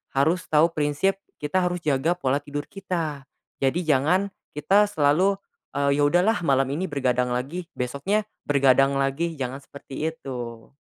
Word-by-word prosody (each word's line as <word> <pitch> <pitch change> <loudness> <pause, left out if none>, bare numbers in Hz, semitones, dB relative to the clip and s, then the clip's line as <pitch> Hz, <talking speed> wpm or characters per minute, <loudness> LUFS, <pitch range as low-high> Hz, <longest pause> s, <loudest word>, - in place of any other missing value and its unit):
harus 160 +6 +2
tahu 160 +2 +4
prinsip, 155 +6 0 0.2
kita 150 +6 -1
harus 175 -1 -3
jaga 150 +4 +1
pola 140 -4 0
tidur 145 0 -5
kita. 165 -8 -4 0.4
Jadi, 160 +5 +1
jangan 160 +8 +3 0.2
kita 195 +8 +3
selalu, 190 +2 +2 0.3
eee, 140 0 +2
ya - - +4
udah 170 +5 +4
lah 225 - +3
malam 135 -2 +3
ini 185 -1 -3
bergadang 125 -3 0
lagi, 140 +9 -3
besoknya 185 +12 -1 0.2
bergadang 135 -1 +3
lagi, 140 +5 0
jangan 135 +2 -4
seperti 140 +3 -5
itu. 120 -7 -7
145 Hz, 150 wpm, -24 LUFS, 135-175 Hz, 0.4 s, tahu